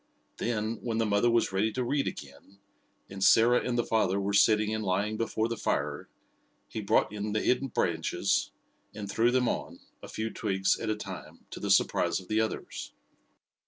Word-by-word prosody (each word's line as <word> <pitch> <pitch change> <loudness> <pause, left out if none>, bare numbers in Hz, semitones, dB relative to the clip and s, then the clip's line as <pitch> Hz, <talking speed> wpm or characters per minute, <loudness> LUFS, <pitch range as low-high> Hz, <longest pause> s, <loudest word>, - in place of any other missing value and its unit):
Then, 110 -1 -2
when 115 -2 -2
the 115 - +2
mother 105 +3 +2
was 115 -3 +2
ready 100 +3 +1
to 125 - -1
read 140 +3 0
again, 100 - -9 0.5
and 95 0 -5
Sarah 120 +4 +5
and 125 -1 -1
the 120 - +2
father 100 -4 +1
were 100 +1 -2
sitting 105 +1 +4
and 110 0 -2
lying 100 +3 0
before 110 0 -1
the 115 - -3
fire, 70 0 -2 0.6
he 110 - -5
brought 100 0 +2
in 105 0 -3
the 110 - +1
hidden 130 +2 +1
branches 85 -9 0 0.5
and 105 -1 -6
threw 115 +3 +3
them 125 0 +2
on, - - -3 0.2
a - - -9
few 110 0 -4
twigs 95 -3 0
at - - -3
a 110 - +1
time, 105 - -9
to - - -7
the - - -4
surprise - - +3
of 90 - -14
the 110 +1 +2
others. 110 - -4
110 Hz, 190 wpm, -29 LUFS, 100-115 Hz, 0.6 s, Sarah